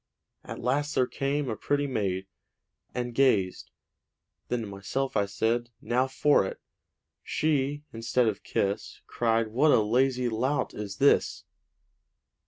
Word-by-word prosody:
At - - -7
last 145 +5 0
there 130 - +4
came 140 +2 -2
a 110 - -2
pretty 145 +5 0
maid, 95 -8 -1 0.7
And 120 -1 -3
gazed; 110 -8 +2 0.8
then 125 -1 -1
to - - -4
myself 100 +7 -3
I 100 -1 +2
said, 115 +4 0
'Now 125 +3 +1
for 145 0 +3
it!' 95 - -5 0.6
She, 145 -1 0
instead 115 +2 +1
of 105 -3 -1
kiss, 100 +1 -2
Cried, 115 -1 0
'What 135 +8 +3
a 145 - +6
lazy 125 +3 +2
lout 125 +6 -1
is 100 -2 -6
this!' 140 +4 +3
120 Hz, 135 wpm, -28 LUFS, 110-135 Hz, 0.8 s, a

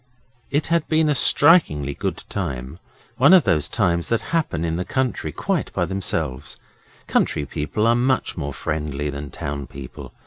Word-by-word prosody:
It 145 +2 0
had 165 -1 +1
been 155 -1 +2
a - - +3
strikingly 130 - +4
good - - -4
time 70 -5 -4 0.4
one 145 +9 +7
of 180 - +6
those 75 -5 +1
times 85 -6 0
that 115 - +1
happen 115 - 0
in 80 0 -1
the 90 - -1
country 130 +4 -2
quite - - -2
by - - 0
themselves. 70 -8 -3 0.5
Country 75 - +1
people 75 +9 -2
are 115 - +5
much 125 +2 +1
more 75 -4 -4
friendly 75 0 -3
than 70 0 -6
town 70 -1 -5
people. 65 0 -10
85 Hz, 165 wpm, -22 LUFS, -, 0.5 s, one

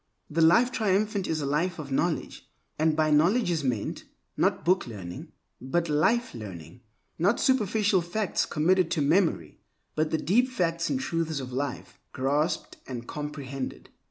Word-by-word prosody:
The 165 +2 +1
Life 235 +10 +5
Triumphant 205 -2 0
is 155 -1 -1
a - - -2
life 160 +5 0
of 145 -3 -7
knowledge; 135 - -2 0.3
and 155 0 +3
by 155 -1 +2
knowledge 175 +8 +3
is 160 -3 -1
meant, 120 -6 -2 0.3
not - - +1
booklearning, 110 - -1 0.3
but 165 +6 -1
life 155 +11 +2
learning; 95 - -9 0.4
not 200 +7 +2
superficial 215 -6 +2
facts 180 +4 -1
committed 175 +3 +2
to 170 -3 0
memory, 155 - +1 0.3
but 155 0 0
the 160 - +1
deep 230 +12 +2
facts 170 -7 -1
and 265 - 0
truths 165 - -2
of 130 -2 -7
life, 135 0 -4
grasped 145 +5 -1
and 120 -2 -6
comprehended. 145 -3 -6
160 Hz, 150 wpm, -27 LUFS, 140-185 Hz, 0.4 s, Life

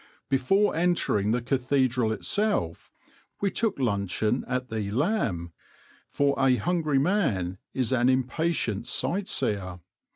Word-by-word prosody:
Before 195 +11 +2
entering 165 - +1
the 120 +2 0
cathedral 130 -2 +1
itself 200 - -1 0.5
we 200 -1 0
took 225 -1 0
luncheon 105 -1 0
at 125 0 -2
the 110 -3 -3
"Lamb," 110 - -1 0.6
for 140 0 +1
a 135 -1 +4
hungry 155 - 0
man 130 - 0 0.2
is 130 -2 0
an 125 -1 +3
impatient 130 - 0
sight 190 +9 -1
seer. 95 -4 -1
130 Hz, 120 wpm, -26 LUFS, 105-165 Hz, 0.6 s, a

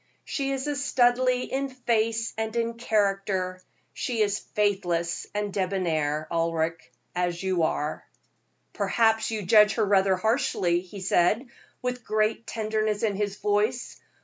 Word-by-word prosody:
She 275 -1 -2
is 270 0 -2
a 295 -1 -1
Studleigh 250 -2 +2
in 275 +1 -2
face 230 -3 0
and 220 +1 -3
in 230 0 0
character. 195 -5 0 0.3
She 235 -3 -2
is 205 0 0
faithless 175 -5 -1
and 205 -1 -2
debonair, 160 -6 -1
Ulric, 165 0 -1 0.2
as 175 0 -1
you 185 -2 +1
are." 150 -1 -1 0.7
"Perhaps 225 -1 +2
you 220 -2 -3
judge 210 +3 +5
her 220 - +2
rather 195 -1 +3
harshly," 185 -4 +1
he 190 +2 -10
said, 190 +6 +2 0.4
with 250 -1 -2
great 215 +1 0
tenderness 215 -1 -1
in 215 -2 +2
his 205 0 -2
voice. 210 +5 -1
210 Hz, 135 wpm, -26 LUFS, 185-230 Hz, 0.7 s, judge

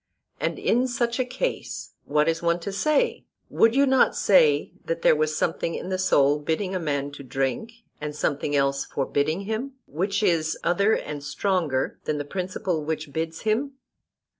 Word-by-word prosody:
And - - -1
in 250 +3 +2
such 240 0 -1
a - - +3
case 255 - -4
what 150 +1 +2
is 165 0 +1
one 170 0 +1
to 200 - -4
say? 290 +10 +1 0.3
Would 230 +1 +4
you 280 +1 +5
not 265 -1 +4
say 150 -7 +4
that 165 0 -3
there - - +6
was 155 0 0
something 165 0 -1
in - - -5
the 185 -1 -1
soul 145 -5 +3
bidding 165 +6 -2
a 185 - -1
man 145 -3 -2
to 140 - -10
drink, 135 - -3 0.2
and 150 -1 -4
something 145 -1 -1
else 140 0 +2
forbidding 145 +5 -1
him, 220 +7 -3
which 195 +7 -1
is 165 -5 +2
other 200 +5 +3
and 150 -1 -5
stronger 160 -5 -1
than 150 - -1
the 145 - -3
principle 180 -1 -2
which 155 -1 -4
bids 160 +1 -3
him? 235 +6 0
165 Hz, 175 wpm, -25 LUFS, 150-210 Hz, 0.3 s, there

